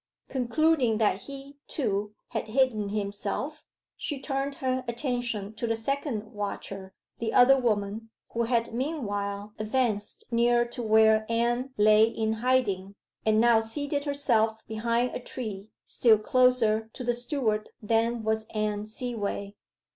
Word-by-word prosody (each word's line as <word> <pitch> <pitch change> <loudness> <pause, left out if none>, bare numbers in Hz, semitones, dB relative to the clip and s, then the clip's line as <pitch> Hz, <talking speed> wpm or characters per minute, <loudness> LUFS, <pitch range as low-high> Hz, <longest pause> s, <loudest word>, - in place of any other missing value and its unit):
Concluding 260 -2 +2
that 210 -3 +1
he, 280 0 -10
too, 210 -6 -2
had - - -3
hidden 220 -3 +1
himself, 200 -1 -3 0.3
she 290 -3 -3
turned 275 0 -2
her 260 -1 -1
attention 235 -4 -2
to 230 +2 -3
the 225 - +1
second 225 -2 -3
watcher, 195 -2 -5 0.2
the 225 -1 -1
other 255 +2 +7
woman, 220 -3 -1 0.2
who 235 0 +1
had 230 -1 0
meanwhile 205 -7 -3
advanced 215 -2 -1
near 240 +1 +3
to 240 +1 -6
where 220 -1 +5
Anne 240 +3 +1
lay 215 +1 +6
in 220 -1 -1
hiding, 205 -7 +1 0.3
and 215 0 +4
now 230 -1 +5
seated 285 +5 -3
herself 225 -6 +1
behind 230 +3 0
a - - -3
tree, 215 -5 -6 0.2
still 225 -3 +4
closer 225 -1 +3
to 255 - -6
the 240 0 +1
steward 240 -4 -1
than 230 +1 +1
was 220 0 -1
Anne 210 0 -1
Seaway. 215 -3 -3
225 Hz, 135 wpm, -28 LUFS, 215-250 Hz, 0.3 s, other